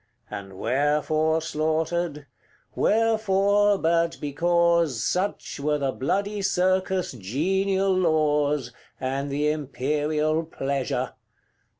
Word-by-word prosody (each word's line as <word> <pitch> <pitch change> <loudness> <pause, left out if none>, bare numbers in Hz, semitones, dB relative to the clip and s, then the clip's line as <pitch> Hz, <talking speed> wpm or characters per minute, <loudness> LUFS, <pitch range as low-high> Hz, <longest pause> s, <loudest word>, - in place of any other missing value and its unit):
And 95 -1 -7
wherefore 150 +6 +1
slaughtered? 160 0 -1 0.5
wherefore, 205 -2 +2
but 165 -1 +1
because 170 -3 +1
Such 185 -4 -2
were 150 +1 +1
the 135 -2 -1
bloody 200 +10 -1
circus' 185 0 +1
genial 190 - 0
laws, 150 -6 +1 0.3
And 135 +2 -2
the 145 +2 +1
imperial 150 +2 -1
pleasure. 140 -4 -2
155 Hz, 85 wpm, -25 LUFS, 145-185 Hz, 0.5 s, wherefore